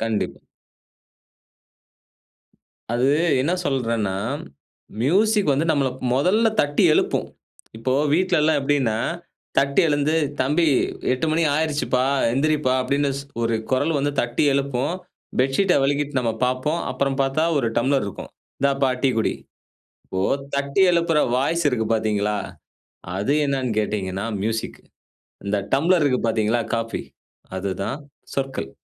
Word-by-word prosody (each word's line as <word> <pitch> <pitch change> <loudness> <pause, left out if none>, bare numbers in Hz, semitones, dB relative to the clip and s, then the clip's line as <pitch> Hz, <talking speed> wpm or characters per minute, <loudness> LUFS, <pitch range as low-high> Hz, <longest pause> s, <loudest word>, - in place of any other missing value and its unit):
கண்டிப்பா. 110 -2 -2 2.5
அது 125 +3 +2 0.3
என்ன 165 +6 0
சொல்றேன்னா, 115 -7 -1 0.9
மியூசிக் 200 - +3
வந்து 145 +5 0
நம்மள 140 -3 +2 0.3
முதல்ல 190 - +3
தட்டி 145 0 0
எழுப்பும். - - +1 0.5
இப்போ 130 +3 -1 0.2
வீட்டில 180 -1 +2
எல்லாம் 155 -1 +3
எப்படின்னா, 135 -6 +1 0.6
தட்டி 140 0 +3
எழுந்து, 145 +1 +1 0.3
தம்பி 150 +6 +2 0.5
8 130 +5 -1
மணி 165 +1 +2
ஆகிருச்சுப்பா, 150 -4 0 0.3
எந்திரிப்பா 145 0 +1
அப்படின்னு 140 +2 0
ஸ் 140 - -7 0.2
ஒரு 115 0 +1 0.2
குரல் 145 +5 +1
வந்து 145 +1 0
தட்டி 120 +4 0
எழுப்பும், 140 +2 -1 0.5
பெட்ஷீட் 135 +9 +2
வெலக்கிட்டு 145 -1 0
நம்ம 115 -2 0
பார்ப்போம். 130 +6 -1
அப்புறம் 135 0 -1
பார்த்தா 135 +4 +1
ஒரு 120 -4 +1
டம்ளர் 135 0 +1
இருக்கும். 100 - -8 0.3
"இந்தாப்பா, 135 -1 +2
டீ 135 - +4
குடி." 110 - 0 0.7
இப்போ 95 - -3 0.3
தட்டி 140 +6 0
எழுப்புற 170 -2 +2 0.2
வாய்ஸ் 165 +5 0
இருக்கு 115 -4 -1
பார்த்தீங்களா, 105 -1 0 0.8
அது 105 +9 0
என்னன்னு 135 -3 -1
கேட்டீங்கன்னா 100 -2 -3 0.2
மியூசிக் 110 +1 -3 0.7
இந்த 105 +1 0 0.2
டம்ப்ளர் 165 +5 +3
இருக்கு 130 -3 +1
பார்த்தீங்களா 110 +1 +1
காஃபி, 115 0 -3 0.5
அதுதான் 100 +6 -3 0.4
சொற்கள். 135 -1 -3
135 Hz, 120 wpm, -22 LUFS, 115-150 Hz, 2.5 s, டீ